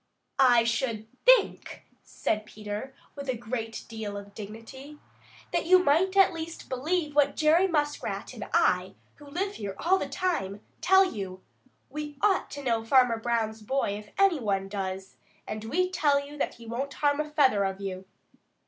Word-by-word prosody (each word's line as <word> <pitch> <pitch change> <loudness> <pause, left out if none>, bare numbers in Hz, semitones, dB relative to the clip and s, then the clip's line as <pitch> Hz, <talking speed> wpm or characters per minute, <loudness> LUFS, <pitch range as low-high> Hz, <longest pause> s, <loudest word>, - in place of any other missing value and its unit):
"I 245 -3 +6
should 235 -2 -1 0.2
think," - - +3 0.2
said 215 0 -2
Peter 210 +5 -6 0.2
with 280 -2 -7
a 250 - 0
great 225 -1 -5
deal 215 -3 -5
of 200 0 -10
dignity, 225 +8 -10 0.6
"that - - 0
you 370 +1 +8
might 365 +4 +2
at 385 -2 +6
least 330 0 -7
believe 300 +4 -1
what 290 -1 +3
Jerry 320 +4 +4
Muskrat 295 -4 -2
and - - -7
I, - - +2 0.2
who 290 - -14
live 385 +7 -3
here 200 -2 -5
all 380 +3 +2
the - - -3
time, 210 - -2 0.2
tell 380 +1 +6
you. 190 - -6 0.5
We 295 0 -6
ought 395 0 +2
to 285 -1 -7
know 230 -3 0
Farmer 245 -1 +4
Brown's 225 -2 -1
boy 265 +2 0
if 210 +1 -7
any 390 -5 +4
one 195 -4 -1
does, 190 -1 -5 0.3
and 215 0 -5
we 365 +10 0
tell 295 -6 +3
you 285 +1 -9
that 295 - -2
he 235 - -13
won't 255 +5 -4
harm 290 0 +1
a 305 0 -2
feather 265 -9 +3
of 195 0 -2
you." 190 -1 -5
265 Hz, 170 wpm, -28 LUFS, 215-305 Hz, 0.6 s, you